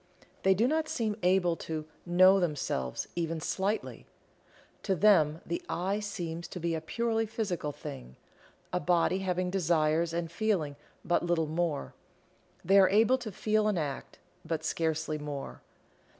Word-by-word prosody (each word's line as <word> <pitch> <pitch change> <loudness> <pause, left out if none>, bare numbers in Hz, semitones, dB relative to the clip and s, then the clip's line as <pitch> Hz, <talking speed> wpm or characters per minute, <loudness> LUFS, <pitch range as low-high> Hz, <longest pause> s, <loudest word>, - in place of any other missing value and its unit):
They 190 0 +4
do 225 +6 +3
not 315 +2 0
seem 220 -3 -1
able 180 -1 +3
to 155 -1 -5 0.2
"know 185 +2 +6
themselves" 145 - -2
even 165 -1 -2
slightly. 190 +7 -2 0.7
To 195 - 0
them 165 -5 +4
the 345 - -3
"I" 190 +4 -1
seems 175 -5 -5
to 180 - -7
be 170 0 -1
a 160 - -2
purely 225 +6 -1
physical 190 -9 -2
thing 135 - -9 0.6
a 180 - +2
body 175 +2 +2
having 180 -1 -1
desires 165 -2 +2
and 165 0 -3
feeling 175 -8 0 0.3
but 175 0 +2
little 170 -2 +1
more. 160 -1 -2 0.7
They 195 +1 +6
are 190 - +6
able 225 +6 +4
to 230 -4 -6
feel 215 +2 +1
an 210 -3 +1
act, 145 -4 -4 0.3
but 160 -1 -3
scarcely 155 -1 -1
more. 145 -2 -6
175 Hz, 150 wpm, -30 LUFS, 160-200 Hz, 0.7 s, know